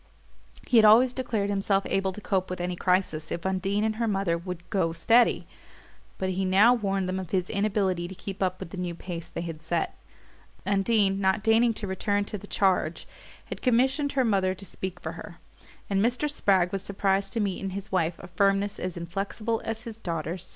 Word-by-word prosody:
He 245 - +3
had 220 - +8
always 240 +4 +7
declared 220 -6 -1
himself 195 0 +1
able 195 0 0
to 190 - -8
cope 190 -2 -1
with 185 - -4
any 175 0 -2
crisis 180 -4 0
if 170 - -4
Undine 190 +2 0
and 220 0 0
her 230 0 0
mother 195 -5 +1
would 175 0 -6
"go 170 -5 +1
steady"; 230 +8 +3 0.7
but 190 0 -1
he 190 +1 -1
now 195 +6 +6
warned 195 -5 -1
them 185 +1 -2
of 185 -3 -6
his 185 -1 -1
inability 195 -4 0
to 190 - -9
keep 195 +1 -7
up 185 -1 0
with 165 - -8
the - - -7
new 175 -1 -3
pace 170 -1 -6
they 170 - -5
had 165 -2 -6
set. 165 +1 -2 0.7
Undine, 200 0 +2
not 190 +2 +2
deigning 225 +1 +4
to 210 - -5
return 205 +1 0
to 210 - -5
the 205 - -12
charge, 185 -5 +1 0.4
had - - -7
commissioned 265 +4 +2
her 265 -2 +2
mother 190 -4 +2
to 195 - -10
speak 185 0 -6
for 160 - -5
her; 170 0 -10 0.5
and 195 -1 +1
Mr. 245 +5 +1
Spragg 190 -11 +2
was 195 - -2
surprised 195 0 0
to 230 - -1
meet 200 -3 -1
in 195 - -3
his 195 +1 -6
wife 170 -3 +1
a - - -10
firmness 195 +3 +1
as 180 -1 -4
inflexible 200 +6 -3
as 225 0 -3
his 225 -2 -8
daughter's. 170 -1 -4
195 Hz, 205 wpm, -27 LUFS, 180-210 Hz, 0.7 s, had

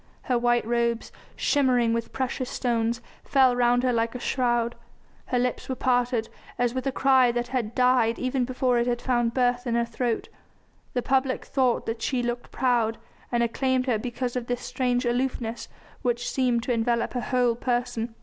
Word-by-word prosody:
Her 250 -2 +1
white 240 -1 +2
robes, 235 0 0 0.2
shimmering 250 -5 +2
with 230 0 -2
precious 260 -1 -2
stones, 235 -1 -1 0.2
fell 260 -3 +4
round 245 0 +3
her 255 -1 +2
like 230 +1 0
a - - -4
shroud, 240 -2 0 0.5
her 250 - 0
lips 250 +1 -1
were 260 - -1
parted 245 -3 +1 0.3
as 245 -1 +1
with 260 +1 -3
a - - +1
cry 260 -2 +4
that 240 0 -2
had 235 -4 -2
died 250 -2 +3
even 255 0 0
before 250 -1 +1
it 235 - 0
had 240 -1 0
found 240 -2 0
birth 245 0 +1
in 235 - 0
her 235 0 +2
throat. 235 0 -2 0.7
The 245 - 0
public 265 -1 +1
thought 255 -3 +1
that 225 0 -4
she 250 +1 0
looked 240 0 -3
proud, 240 -3 +1 0.3
and 240 -1 +2
acclaimed 255 +2 0
her 240 -5 +1
because 245 +1 -3
of 245 -1 -3
this 245 0 -2
strange 250 -1 -1
aloofness 240 -1 -2 0.3
which 240 -2 -1
seemed 245 -3 +1
to 245 - 0
envelop 235 0 0
her 245 - -1
whole 250 -2 +2
person. 240 -1 -2
245 Hz, 180 wpm, -26 LUFS, 235-255 Hz, 0.7 s, fell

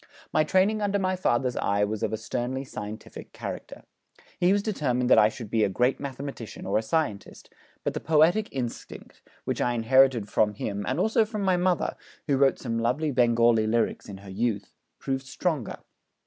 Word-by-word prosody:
My 155 - +4
training 195 +6 +2
under 205 -1 +1
my 185 -1 0
father's 125 -8 0
eye 100 +1 +1
was 105 +1 -2
of - - -1
a 110 - -1
sternly 125 +4 -3
scientific 110 -4 -8
character. - - -7 0.6
He 180 +1 +4
was 200 0 +2
determined 130 - 0
that - - +8
I 105 - +6
should 110 -2 -9
be 110 -1 +2
a - - +2
great 125 +7 +1
mathematician 135 -4 -7
or 100 +2 +1
a - - -2
scientist, 110 -4 -3 0.3
but - - -1
the - - -3
poetic 165 +7 +3
instinct, 125 -4 -6 0.2
which - - -2
I 120 - +1
inherited 120 -1 +4
from 105 0 +1
him 100 0 -3
and 130 - -1
also 220 0 +3
from 215 -1 -4
my 190 -1 +3
mother 180 0 0 0.3
(who 140 -3 +1
wrote 135 0 +4
some 115 -2 -3
lovely 130 +7 0
Bengali 120 -3 +3
lyrics 115 -1 0
in 100 - -7
her 95 - -9
youth), 105 -1 -2 0.2
proved 135 0 -3
stronger. 150 -3 -2
125 Hz, 185 wpm, -26 LUFS, 110-160 Hz, 0.6 s, that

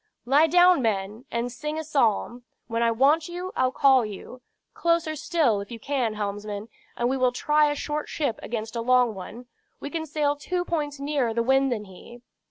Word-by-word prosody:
"Lie 285 +6 +5
down, 355 -1 +5
men, 215 +1 -2
and 235 +1 -2
sing 300 +5 -5
a 315 - -3
psalm. 245 -4 0 0.2
When 230 0 -2
I 235 - +3
want 285 +8 +3
you, 360 +2 -5
I'll 255 0 +2
call 265 -2 +4
you. 215 +4 -8 0.3
Closer 335 -2 0
still, 300 -9 +1
if 200 - -9
you 235 - -7
can, 245 -3 -1
helmsman, 205 +1 -4 0.3
and 240 - +1
we 265 +2 0
will 255 -1 +2
try 300 +4 +2
a 290 - -1
short 300 +1 -4
ship 280 -8 -2
against 225 0 -5
a 230 - -1
long 250 -1 +3
one. 210 +6 -9 0.3
We 285 - -6
can 320 -1 -3
sail 295 -1 0
two 355 +5 -3
points 295 -4 -3
nearer 280 -5 -1
the 235 - +1
wind 270 +2 +3
than 220 -3 -2
he." 235 +6 -14
255 Hz, 195 wpm, -25 LUFS, 230-300 Hz, 0.3 s, Lie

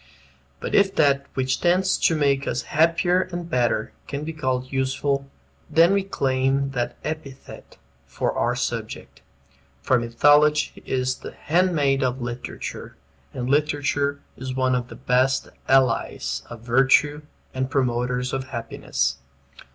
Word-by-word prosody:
But - - -5
if 195 -1 +4
that 140 -1 +3
which 130 -1 0
tends 185 +2 +3
to 165 - +2
make 140 -2 +1
us 120 - -1
happier 170 +3 +3
and 175 -1 -5
better 120 -6 0
can 140 +1 -4
be 160 +1 -5
called 130 -4 -2
useful, 135 +1 -1 0.4
then 170 +4 +5
we 200 - +3
claim 135 -6 0
that 125 -3 -3
epithet 155 -4 -8 0.3
for - - -1
our - - 0
subject. - - -5 0.6
For 130 - +3
Mythology 145 +6 +3
is 130 0 0
the - - -9
handmaid 150 -5 +1
of 130 0 0
literature; 120 0 -6 0.4
and 125 -1 -4
literature 145 0 +1 0.2
is 130 0 -6
one 130 -1 +1
of 125 -1 -1
the - - -10
best 130 +2 +1 0.2
allies 115 - +2
of 120 -2 -9
virtue 135 +5 +3 0.3
and 130 0 -2
promoters 125 -1 0
of 135 0 -2
happiness. 115 - -2
135 Hz, 135 wpm, -23 LUFS, 125-150 Hz, 0.6 s, then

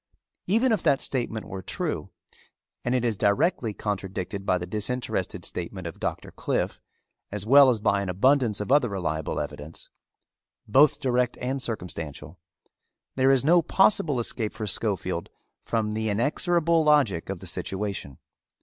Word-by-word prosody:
Even 230 +6 +3
if 215 -6 +1
that 140 - +3
statement 120 -4 -2
were 95 0 -6
true, - - -3 0.7
and 125 +1 0
it 125 -1 +1
is 115 -2 +1
directly 110 - +1
contradicted 100 -1 -4
by 90 - +3
the 90 - -5
disinterested 105 +7 -2
statement 90 +1 -4
of 85 - -7
Doctor - - -4
Cliffe - - -2 0.5
as 105 0 -4
well 140 +3 +8
as 120 -3 +1
by 100 -1 +1
an 100 - -3
abundance 115 +3 +2
of 105 +4 -3
other 140 -4 +4
reliable 80 -6 -2
evidence, 75 +3 -7 0.8
both 140 +7 +5
direct 125 -1 0
and 130 +2 -2
circumstantial, 85 - -6 0.8
there 130 0 +3
is 135 -1 +4
no 170 +3 +6
possible 165 - +2
escape 115 -2 -2
for 110 - -5
Schofield 95 -4 -1 0.3
from 110 -2 -1
the 110 0 -1
inexorable 165 - +2
logic 135 - +3
of 100 - -3
the 95 - -11
situation. 95 -4 -4
110 Hz, 150 wpm, -26 LUFS, 95-135 Hz, 0.8 s, well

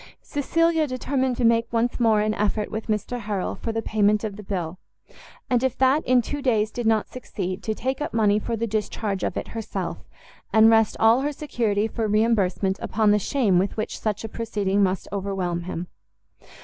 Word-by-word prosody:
Cecilia 325 +2 +1
determined 260 -1 -1
to 245 - +1
make 230 0 +3
once 235 +2 0
more 220 -3 +4
an 215 0 +1
effort 210 0 -1
with 220 0 -4
Mr 220 +3 -2
Harrel 205 -4 -2
for 225 - -4
the 225 0 -3
payment 210 0 +2
of 210 -2 -3
the 210 - -9
bill, 185 -3 -4 0.7
and 245 0 +1
if 260 -2 0
that, 265 +4 +3
in 250 -1 +4
two 290 +5 -4
days, 220 -5 +1
did 240 -2 -3
not 220 -1 +2
succeed, 190 -6 -5
to 220 - -2
take 260 +5 -3
up 295 - -2
money 210 -2 +3
for 230 +2 -3
the 230 - -1
discharge 210 -2 -2
of - - -2
it - - -4
herself, 225 -1 -5 0.5
and 220 +1 +6
rest 225 -1 +3
all 225 +3 +5
her 290 +2 -1
security 225 -8 -1
for 225 -1 -2
reimbursement 205 -3 +1
upon 215 0 +2
the 210 - +4
shame 210 -5 +2
with 195 +4 -1
which 215 - -3
such 210 -1 -2
a - - -3
proceeding 205 -3 -1
must 190 -1 0
overwhelm 185 -3 -2
him. 175 -1 -4
220 Hz, 195 wpm, -24 LUFS, 205-240 Hz, 0.7 s, and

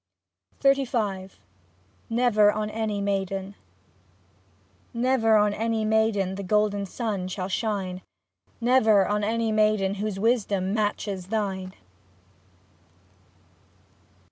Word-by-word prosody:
XXXV 235 -9 0 0.7
NEVER 225 -3 +4
ON 210 0 -3
ANY 215 -2 -2
MAIDEN 195 -1 -2 1.4
Never 235 -2 +3
on 210 -1 +3
any 225 0 -1
maiden, 215 -3 +1
the 195 - -5
golden 205 0 +1
sun 205 -3 -3
shall 185 0 -4
shine, 190 -3 -2 0.6
Never 225 -5 +4
on 210 0 0
any 225 +1 0
maiden 215 -2 +2
whose 210 -2 -3
wisdom 200 -4 +1
matches 205 -3 -2
thine. 190 -3 -3
210 Hz, 90 wpm, -25 LUFS, 195-225 Hz, 1.4 s, NEVER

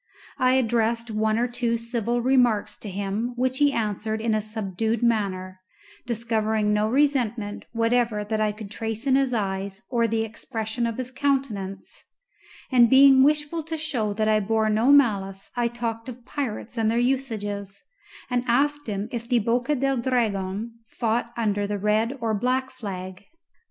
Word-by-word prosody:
I 255 0 +4
addressed 230 -1 +1
one 215 0 +1
or 240 +1 +1
two 240 -1 -1
civil 235 0 -2
remarks 245 -5 +2
to 210 - -7
him, 200 +5 -3
which 260 +2 0
he 290 -1 +4
answered 220 -2 -2
in 225 0 0
a 215 - +1
subdued 215 +1 -2
manner, 190 -5 0 0.5
discovering 220 -2 0
no 210 +1 +1
resentment 240 -6 0
whatever 230 -2 +1
that 215 +1 -2
I 215 -1 +2
could 210 -1 -9
trace 225 +2 -4
in 270 - +3
his 270 -1 +2
eyes 195 -2 -3
or 235 -2 +2
the 225 0 0
expression 225 +1 -3
of 230 - -4
his 255 0 -5
countenance; 255 -9 -2 0.7
and 240 -2 +6
being 270 0 +7
wishful 300 +3 +2
to 320 +1 -5
show 250 -9 -1
that 215 +1 0
I 215 0 +4
bore 220 +1 +1
no 225 +6 +3
malice 200 -8 +2
I 240 -1 +1
talked 230 0 -4
of 245 -1 -10
pirates 245 -3 -4
and 220 -1 +2
their 230 - +1
usages, 215 -6 -2 0.4
and 245 -1 0
asked 290 +3 +1
him 205 0 -3
if 235 -1 -5
the 245 - +3
Boca 240 +6 +1
del 270 0 0
Dragon 225 -3 -1 0.2
fought 235 0 0
under 205 -3 0
the 205 0 -2
red 215 +6 +1
or 225 -2 -1
black 255 +5 0
flag. 190 -5 -7
230 Hz, 165 wpm, -25 LUFS, 210-250 Hz, 0.7 s, being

